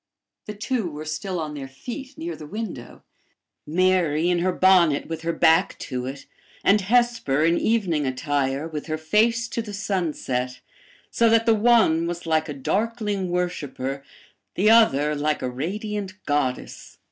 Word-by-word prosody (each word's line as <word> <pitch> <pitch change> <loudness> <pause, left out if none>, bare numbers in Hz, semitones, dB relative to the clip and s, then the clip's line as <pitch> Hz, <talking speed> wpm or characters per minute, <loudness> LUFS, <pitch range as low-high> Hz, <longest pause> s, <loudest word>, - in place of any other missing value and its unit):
The 210 - -6
two 220 -2 -2
were 150 0 -8
still 175 +4 -3
on 155 -2 -4
their 140 -2 -6
feet, 255 - -8
near 335 +2 -5
the 150 - -10
window 195 - -7 0.6
Mary, 175 -1 +2
in 175 - +1
her 185 +2 +1
bonnet, 180 -5 +4
with 165 -1 -5
her 165 +1 -1
back 165 +2 +3
to 125 -2 -5
it, 135 +1 -7 0.4
and 205 +1 +4
Hesper, 225 - +2
in 170 +1 +3
evening 180 -11 +1
attire, 140 +2 -1
with 155 -1 -6
her 155 0 -2
face 220 +9 +2
to 230 - -2
the 210 -2 -7
sunset, 150 -11 -2 0.5
so 230 -1 +3
that 225 0 +4
the 230 - +5
one 215 -7 +3
was 175 0 -5
like 160 -1 +1
a - - -3
darkling 205 - -1
worshiper, 145 -6 -3 0.5
the 210 +4 +4
other 150 -10 +4
like 150 +1 0
the 125 - -2
radiant 200 - -4
goddess. 145 -3 -2
170 Hz, 160 wpm, -24 LUFS, 150-210 Hz, 0.6 s, the